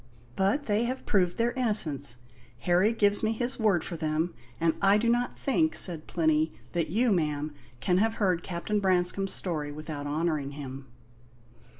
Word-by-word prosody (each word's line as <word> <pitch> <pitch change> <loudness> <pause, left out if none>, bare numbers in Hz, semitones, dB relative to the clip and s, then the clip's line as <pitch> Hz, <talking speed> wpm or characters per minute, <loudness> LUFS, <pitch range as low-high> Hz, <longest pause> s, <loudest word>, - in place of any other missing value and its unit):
"But 205 +10 +1
they 215 +2 +1
have 255 +2 -4
proved 180 -3 +1
their 235 +1 +1
innocence; 190 - 0 0.4
Harry 180 - +3
gives 205 -3 +2
me 220 0 +1
his 245 +3 -3
word 200 -7 +2
for 175 - -5
them; 155 +2 -1 0.3
and 165 -1 +2
I 200 +1 +5
do 230 +2 0
not 240 +1 +1
think," 315 +4 +1
said 165 -4 +3
Plinny, 155 -1 +1 0.2
"that 165 -3 -1
you, 225 +7 +2
ma'am, 150 -4 -1 0.3
can 180 +6 +2
have 225 +2 +1
heard 185 -5 +1
Captain 185 +5 -2
Branscome's 190 0 +1
story 155 -5 -2
without 150 -1 -6
honouring 150 -2 -1
him." 135 -1 -8
180 Hz, 165 wpm, -28 LUFS, 155-215 Hz, 0.4 s, I